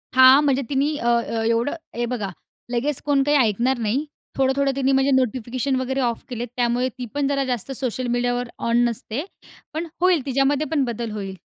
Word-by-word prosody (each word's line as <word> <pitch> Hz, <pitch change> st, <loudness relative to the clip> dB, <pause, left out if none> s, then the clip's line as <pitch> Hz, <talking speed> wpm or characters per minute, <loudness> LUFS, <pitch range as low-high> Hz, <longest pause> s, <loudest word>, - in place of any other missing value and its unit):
हां. 260 Hz, +2 st, +8 dB
म्हणजे 275 Hz, -2 st, +2 dB
तिनी 285 Hz, +2 st, +1 dB
अ, 235 Hz, -, -3 dB
अ, 235 Hz, -1 st, +1 dB
एवढं 230 Hz, +6 st, +1 dB, 0.2 s
हे 240 Hz, -, -1 dB
बघा 210 Hz, -5 st, -3 dB, 0.4 s
लगेच 255 Hz, +4 st, -1 dB
कोण 280 Hz, -2 st, +3 dB
काही 290 Hz, +1 st, +3 dB
ऐकणार 240 Hz, +2 st, +2 dB
नाही. 235 Hz, +7 st, 0 dB, 0.3 s
थोडं-थोडं 270 Hz, +1 st, +2 dB
तिनी 270 Hz, 0 st, +1 dB
म्हणजे 270 Hz, +1 st, +3 dB
नोटिफिकेशन 255 Hz, +1 st, 0 dB
वगैरे 260 Hz, +1 st, -1 dB
ऑफ 235 Hz, -2 st, -1 dB
केले. 240 Hz, -1 st, -3 dB
त्यामुळे 245 Hz, +1 st, +1 dB
ती 250 Hz, -, -4 dB
पण 285 Hz, -1 st, 0 dB
जरा 275 Hz, -1 st, +1 dB
जास्त 250 Hz, 0 st, -3 dB
सोशल 255 Hz, -1 st, -2 dB
मीडियावर 245 Hz, 0 st, 0 dB, 0.2 s
ऑन 240 Hz, +1 st, +4 dB
नसते. 235 Hz, +4 st, -4 dB, 0.5 s
पण 330 Hz, +2 st, -3 dB
होईल 355 Hz, -7 st, +3 dB
तिच्यामध्ये 275 Hz, +2 st, +1 dB
पण 290 Hz, -4 st, +2 dB
बदल 235 Hz, -1 st, -4 dB
होईल. 195 Hz, -3 st, -5 dB
255 Hz, 180 wpm, -22 LUFS, 235-275 Hz, 0.5 s, हां